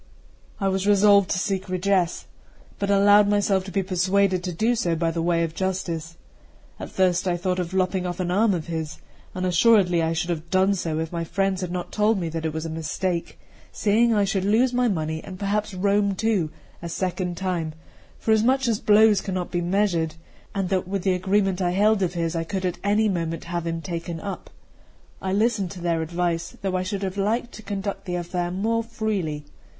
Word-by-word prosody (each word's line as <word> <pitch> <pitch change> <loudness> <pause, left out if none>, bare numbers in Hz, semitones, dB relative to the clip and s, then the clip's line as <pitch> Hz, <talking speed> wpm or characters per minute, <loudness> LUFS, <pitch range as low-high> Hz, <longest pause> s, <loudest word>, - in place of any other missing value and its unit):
I 195 - 0
was 190 +1 0
resolved 200 -1 +5
to - - 0
seek 190 0 -2
redress, 185 -1 0 0.5
but 200 - -1
allowed 205 +1 +6
myself 205 -2 +2
to 190 - -7
be 195 +2 0
persuaded 185 0 +1
to 180 - -2
do 220 +8 +1
so 180 -8 0
by 165 0 0
the 165 0 -2
way 170 0 +2
of 165 -1 -3
justice. 170 -3 -3 0.6
At - - -6
first 185 0 +1
I 175 -1 +1
thought 180 +1 -1
of 175 -1 -3
lopping 185 -1 0
off 175 0 -5
an 180 -1 -1
arm 205 +1 +3
of 165 - -4
his; 160 -3 -4 0.4
and 185 0 -2
assuredly 180 -1 +4
I 165 0 0
should 175 +2 -1
have 165 0 -4
done 190 +2 +3
so, 165 -5 -2
if 160 0 -3
my 170 -1 -2
friends 195 +2 -1
had 180 -1 -3
not 180 -1 -4
told 210 0 +2
me 170 -2 -2
that 160 0 -3
it - - -2
was 160 +1 -4
a - - -3
mistake, 170 +2 -3 0.3
seeing 225 +3 +2
I 210 -2 +3
should 195 -1 0
lose 230 +6 +3
my 250 0 +2
money 160 -5 -2
and 185 - -8
perhaps 210 +2 -1
Rome 200 +1 +2
too 200 -6 +1 0.3
a 170 - -5
second 180 0 -2
time, 175 -4 -2 0.4
forasmuch 235 +4 +2
as 225 -3 +1
blows 210 -1 +5
cannot 185 -3 -3
be 175 - 0
measured, 175 -3 0 0.4
and 195 -2 -1
that 185 -2 0
with 195 -1 -2
the 190 - +2
agreement 190 0 +1
I 175 -1 +1
held 210 +2 +3
of 180 -1 0
his 165 0 -1
I 165 - 0
could 190 +2 -3
at 180 - -2
any 210 +2 +3
moment 165 -4 -2
have 170 -1 -3
him 165 0 -2
taken 170 -1 -4
up. 195 +3 -6 0.7
I 190 - -2
listened 210 -2 +1
to 185 - -9
their 170 -1 0
advice, 170 +1 -2
though 190 -1 -1
I 185 - +1
should 195 +2 -3
have 190 0 -3
liked 225 +5 0
to 215 - -10
conduct 200 -1 -4
the 180 -2 -3
affair 175 0 -2
more 220 +5 0
freely. 205 -10 -3
185 Hz, 205 wpm, -24 LUFS, 170-200 Hz, 0.7 s, allowed